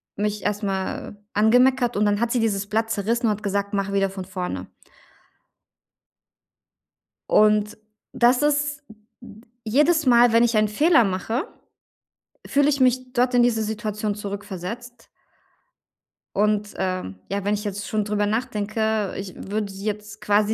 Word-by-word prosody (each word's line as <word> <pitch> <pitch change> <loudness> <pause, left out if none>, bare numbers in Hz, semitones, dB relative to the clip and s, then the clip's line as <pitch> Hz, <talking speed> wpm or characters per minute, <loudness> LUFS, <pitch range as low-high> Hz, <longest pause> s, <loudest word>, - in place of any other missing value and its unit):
mich 210 0 -2
erstmal 200 -1 -3 0.2
angemeckert. 245 +2 +3
Und 210 - +2
dann 205 0 +1
hat 235 0 0
sie 245 - +1
dieses 205 -2 -1
Blatt 225 +1 0
zerrissen 230 +4 0
und 215 - +3
hat 210 +1 -4
gesagt: 200 +1 -2
"Mach 200 0 -1
wieder 195 -1 +1
von 190 -2 -7
vorne." 180 - -5 2.6
Und 210 0 +3 0.4
das 245 +2 +3
ist 290 -1 0
m 215 - -15 0.3
m 215 +2 -14 0.2
jedes 300 +7 +3
Mal, 240 -1 +5
wenn 230 +1 +5
ich 235 -2 +2
einen 215 0 +3
Fehler 290 +4 +4
mache, 225 - -2 1.0
fühle 285 +1 +3
ich 280 -1 0
mich 255 0 +2
dort 250 0 +2
in 245 -1 +5
diese 225 -2 +2
Situation 210 -1 -3
zurückversetzt 205 +4 -7 1.3
und, 210 0 +1
ähm, 185 - -3 0.2
ja, 200 0 -2
wenn 205 - +1
ich 210 +1 -2
jetzt 205 -1 -4
schon 215 -1 -1
drüber 205 0 0
nachdenke, 220 -2 -1
ich 195 -1 -7
würde 205 0 -4
jetzt 210 +1 -5
quasi 210 +1 +2
210 Hz, 145 wpm, -23 LUFS, 200-240 Hz, 2.6 s, Mal